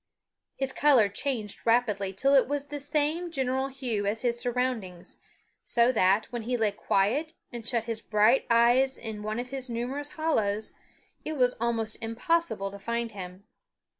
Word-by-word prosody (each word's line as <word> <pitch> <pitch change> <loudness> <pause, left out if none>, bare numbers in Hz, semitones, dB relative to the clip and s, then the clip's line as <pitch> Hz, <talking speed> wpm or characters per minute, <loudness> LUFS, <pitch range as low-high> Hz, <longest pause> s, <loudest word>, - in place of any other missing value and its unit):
His 270 -1 -3
color 260 -9 +5
changed 220 -2 -3
rapidly 225 -4 +2
till 270 +9 +1
it 270 -2 +5
was 285 0 -1
the 290 0 -6
same 300 +4 -1
general 265 -3 -1
hue 245 -7 -2
as 220 +4 -1
his 240 -1 0
surroundings, 240 -8 -3 0.4
so 240 +1 +3
that, 200 -2 +3
when 240 -1 -3
he 245 +3 -1
lay 220 -3 +2
quiet 210 +11 0 0.2
and 240 -2 -7
shut 235 -3 +1
his 225 -1 -4
bright 215 +4 +3
eyes 240 +3 +4
in 220 -2 -6
one 215 +1 -3
of 250 +1 -5
his 265 -2 -5
numerous 265 +6 -4
hollows, 220 -10 0 0.5
it 315 - -3
was 250 -4 +2
almost 225 -2 -1
impossible 230 - -1
to 200 - -9
find 235 +2 -2
him. 185 -1 -8
235 Hz, 165 wpm, -28 LUFS, 215-270 Hz, 0.5 s, color